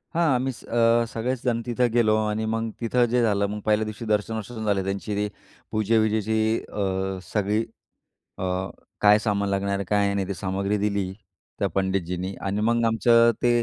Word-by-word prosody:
हां, 170 0 +3
आम्हीच 130 0 -2
अ, 115 0 +3
सगळेच 120 +2 -2
जण 120 -2 0
तिथं 125 0 +1
गेलो 110 -3 +4
आणि 105 +1 -1
मग 115 0 -1
तिथं 120 +1 +2
जे 125 0 +3
झालं, 100 -3 +2
मग 105 +1 -4
पहिल्या 110 0 +2
दिवशी 110 +2 -6
दर्शन-वर्शन 110 +1 -2
झाले 100 -2 +1
त्यांची, 100 +2 -3
ते 105 +1 0 0.4
पूजे-विजेची 110 0 +1 0.4
अ, 95 -1 -2
सगळी 105 +1 0 0.8
अ, - - -5 0.6
काय 105 0 +6
सामान 100 -2 0
लागणार 100 0 0
आहे, 100 - -3
काय 100 +1 +1
नाही? 100 -1 -1
ते 100 - -2
सामग्री 95 +3 -1
दिली. 100 -2 -1 0.5
त्या - - +1
पंडितजींनी 95 -1 -1
आणि 100 +2 -1
मग 115 +2 +2
आमचं 115 +1 +5
ते 120 -1 +3
105 Hz, 165 wpm, -25 LUFS, 100-115 Hz, 0.8 s, काय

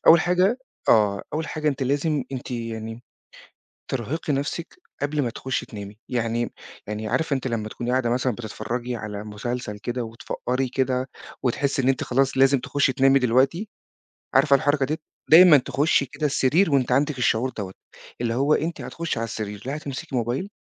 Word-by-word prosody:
أول 165 0 +9
حاجة 180 +8 +2 0.3
آه. 105 -3 +4
أول 160 +1 -1
حاجة 155 -1 -1
أنتِ 140 -1 -1
لازم 145 +1 0
أنتِ 130 -1 -5
يعني 115 -1 -5 0.9
ترهقي 135 +5 -2
نَفْسِك 145 +5 -3 0.3
قبل 145 0 0
ما 120 - -1
تخُشّي 130 +2 -3
تنامي. 105 -1 -9
يعني 120 -1 -1 0.3
يعني 105 +1 -4
عارفة 155 +2 +1
أنتِ 130 - -5
لمّا 110 -2 -2
تكوني 120 +2 -4
قاعده 125 -2 +1
مثلًا 125 +1 +1
بتتفرّجي 120 +2 -4
على 105 -1 -6
مسلسل 105 0 -4
كده 120 +2 -3
وتفقّري 125 +3 -3
كده 130 0 0 0.3
وتحسّي 135 +2 0
إن 130 - +2
أنتِ 135 - +1
خلاص 135 +1 +1
لازم 135 +1 +5
تخُشّي 140 0 +1
تنامي؟ 135 0 +5
دلوقتي 135 - +2 0.7
عارفة 140 +1 +6
الحركة 145 -1 +1
ديّة؟ 155 +3 -2 0.3
دايمًا 170 -1 +10
تخُشّي 140 +1 +1
كده 145 +4 -2
السرير 150 +5 +2
وأنتِ 130 -2 +2
عندِك 140 +1 +2
الشعور 125 +1 +2
دوّة، 95 -2 -4 0.5
اللي 115 -1 0
هو 140 +4 +3
أنتِ 165 +2 -2
هتخُشّي 170 -7 -3
على 115 - 0
السرير 105 -2 -5
لا 140 - -2
هتمسكي 140 -3 -5
موبايل 125 - -1
130 Hz, 165 wpm, -24 LUFS, 115-145 Hz, 0.9 s, دايمًا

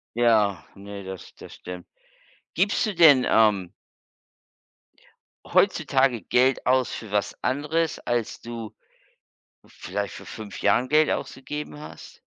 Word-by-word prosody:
Ja, 110 -5 +3
ne, 100 0 -9
das 95 -1 -9
das - - -12
stimmt. 90 0 -9 0.7
Gibst 200 +7 +1
du 210 - -2
denn, 145 -7 +7
ähm 100 -5 +3 1.7
Heutzutage 130 -5 +2
Geld 130 +7 +2
aus 130 0 +2
für 110 - -7
was 100 -1 -1
anderes, 150 +4 0
als 120 -2 -2
du, 115 -2 -8 0.9
vielleicht - - -5
vor - - -10
5 105 -3 -9
Jahren 120 +5 +2
Geld 155 +1 +4
ausgegeben 150 +3 -5
hast? 150 - -12
120 Hz, 115 wpm, -25 LUFS, 100-140 Hz, 1.7 s, denn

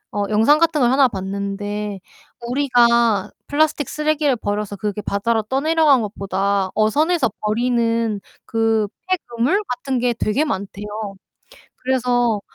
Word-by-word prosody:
어 205 - 0
영상 225 +8 +4
같은 330 -2 +2
걸 245 -1 +3
하나 270 0 +5
봤는데 200 0 -4 0.5
우리가 235 -5 +3 0.2
플라스틱 295 -2 +1
쓰레기를 300 -2 +1
버려서 205 -2 -3
그게 210 +1 -3
바다로 220 +3 0
떠내려간 280 +2 +2
것보다 195 -1 -1
어선에서 295 - +2
버리는 230 -1 0 0.2
그 225 -2 +1 0.2
폐 370 - +3
그물 250 - 0
같은 255 +1 -2
게 245 0 +1
되게 235 +6 0
많대요. 200 -6 -4 0.9
그래서 245 -4 +1
235 Hz, 280 characters per minute, -20 LUFS, 210-270 Hz, 0.9 s, 하나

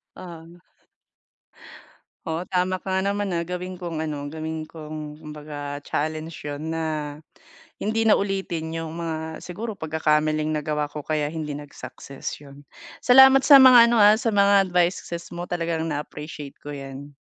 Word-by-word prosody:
Oh. 170 -1 -11 1.6
Oo, 165 +2 -3
tama 185 0 0
ka - - -15
nga 190 - +2
naman, 200 -3 -2
ah, 170 - 0
gawin 180 +1 -5
kong 170 -3 -5
ano, 145 -2 -4
gawin 160 0 -5
kong 155 -1 -8
kumbaga 145 -2 -7
challenge 155 +1 -4
'yon 150 +3 -4
na, 155 -2 -3 0.6
hindi 225 +1 +1
na 215 - +7
ulitin 190 -5 -3
yung 165 0 -5
mga 160 -1 -5
siguro 210 +5 -6
pagkakamaling 155 -1 0
nagawa 150 0 -1
ko 150 - -6
kaya 150 -1 -1
hindi 155 -2 -4
nag-success, 140 -1 -8
'yon. 140 0 -14 0.4
Salamat 265 +1 +8
sa 280 -2 +9
mga 250 -3 +9
ano, 235 - +3
ah, 210 +1 +7
sa 235 -2 0
mga 200 -1 +4
advices 170 -1 -1
mo 175 - -4
talagang 165 -2 -2
na-appreciate 150 -1 -6
ko 145 - -7
'yan. 140 0 -8
160 Hz, 145 wpm, -24 LUFS, 150-185 Hz, 1.6 s, sa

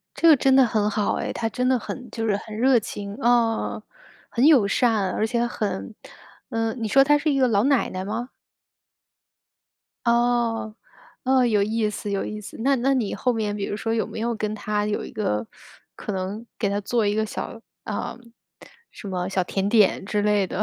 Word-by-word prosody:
这 335 - +4
个 310 - +8
真 265 0 +3
的 265 - +7
很 215 -3 +1
好 210 0 0
哎， - - -3
她 225 - -2
真 250 +3 -1
的 260 -1 +3
很 250 +2 -7
就 225 -1 -3
是 205 -2 +2
很 215 +1 -8
热 250 +2 +4
情。 200 -1 -6
啊， 235 -3 +1 0.5
很 250 +3 +2
友 275 -10 +6
善， 215 -3 +2
而 220 - 0
且 235 +1 0
很 200 - -4 0.6
呃， 225 0 -1
你 230 -3 -3
说 270 +5 +6
她 295 +1 +4
是 305 +1 0
一 275 - +1
个 260 -2 +4
老 205 -2 +2
奶 275 -1 +2
奶 185 0 -4
吗？ 225 +5 -4 1.8
哦， 235 -2 +1 0.5
哦， 260 0 +4
有 215 -4 +3
意 215 +1 0
思 210 0 -5
有 200 -1 -1
意 215 - -5
思。 205 - -10
那 275 +4 +3
那 265 +2 +2
你 235 -6 -1
后 250 - 0
面 215 -3 -2
比 200 - -3
如 205 - -3
说 225 +1 -2
有 225 - 0
没 - - -7
有 235 +1 -1
跟 215 -1 -3
她 210 -1 -1
有 210 - -2
一 - - -8
个， 110 - -1 0.5
可 - - -5
能 195 +4 -4
给 210 - +1
她 200 +1 -1
做 220 +2 0
一 205 - +1
个 220 0 +1
小， 225 +2 -6 0.2
呃， 210 +2 -4 0.7
什 205 - -9
么 180 -1 -2
小 190 -1 0
甜 195 +2 -1
点 210 -4 +3
之 210 0 0
类 205 -2 +2
的 190 - -2
220 Hz, 220 characters per minute, -24 LUFS, 205-240 Hz, 1.8 s, 个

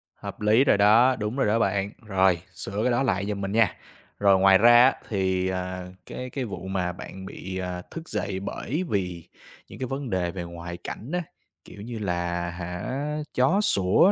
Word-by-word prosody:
Hợp - - -8
lý 110 +5 +5
rồi 140 - +4
đó, 115 +6 +6
đúng 105 +2 -3
rồi 135 - +2
đó 110 +2 +2
bạn, 100 -1 0
rồi 95 -3 +3
sửa 100 +5 -4
cái 125 - +2
đó 120 +3 +2
lại 100 -6 0
giùm 100 -1 -3
mình 100 - -2
nha. 110 -3 +3 0.4
Rồi 100 -2 +5
ngoài 95 0 +7
ra 120 +3 +7
á 135 - +5 0.2
thì, 95 -2 0
à, 90 0 -4 0.2
cái 125 0 -6
cái 130 0 -3
vụ 95 -4 -6
mà 90 -2 -1
bạn 95 +1 -9
bị, 95 0 -6
ờ, 90 -1 -4
thức 165 -1 -8
dậy, 95 -2 -2
bởi 140 - -3
vì 90 -4 -2 0.4
những - - -12
cái 130 - -2
vấn 135 0 -4
đề 90 -3 0
về 90 -1 -5
ngoại 85 0 -7
cảnh 110 +7 -7
á, 180 - +1 0.4
kiểu 100 - -11
như 115 0 -6
là 85 -2 -2
hả 90 +5 -5 0.4
chó 170 +11 +3
sủa 100 - +4
100 Hz, 200 wpm, -26 LUFS, 90-115 Hz, 0.4 s, ngoài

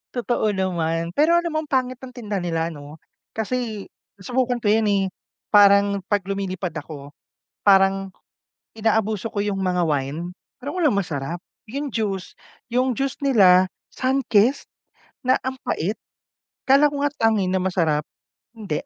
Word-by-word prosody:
Totoo 240 -2 0
naman, 170 -3 -1
pero 310 - +3
alam 345 0 +1
mo, 310 - 0
ang 300 - -14
pangit 255 -1 0
ng 260 -1 -10
tinda 210 -5 -3
nila 165 -1 -2
ano, 145 +1 -11 0.4
kasi 220 -1 -3 0.3
nasubukan 245 +4 -1
ko 210 - 0
'yun, 220 0 +3
eh, 200 -1 +2 0.5
parang 200 -1 +6
'pag 205 -2 +1
lumilipad 190 -2 -3
ako 145 -2 -8 0.5
parang 195 -1 +4 0.7
inaabuso 220 -1 0
ko 205 - 0
'yung 205 -1 -1
mga 180 -2 +1
wine, 150 +4 -2 0.3
pero 285 - -5
walang 305 - +3
masarap. 165 -3 -3 0.3
'Yung 280 +4 -3
juice 195 -4 -2 0.4
'yung 250 +1 +1
juice 275 -1 -2
nila, 185 -8 +6 0.3
Sunkist 255 -2 +2 0.6
na 255 - +4
ang 260 0 -3
pait, 200 +7 -1 0.7
akala 280 +2 +6
ko - - -4
nga 290 - +2
Tang, 225 -1 +3
eh, 185 - 0
na 190 0 +1
masarap 165 -5 +1 0.5
hindi. 200 -9 -3
200 Hz, 145 wpm, -22 LUFS, 180-245 Hz, 0.7 s, parang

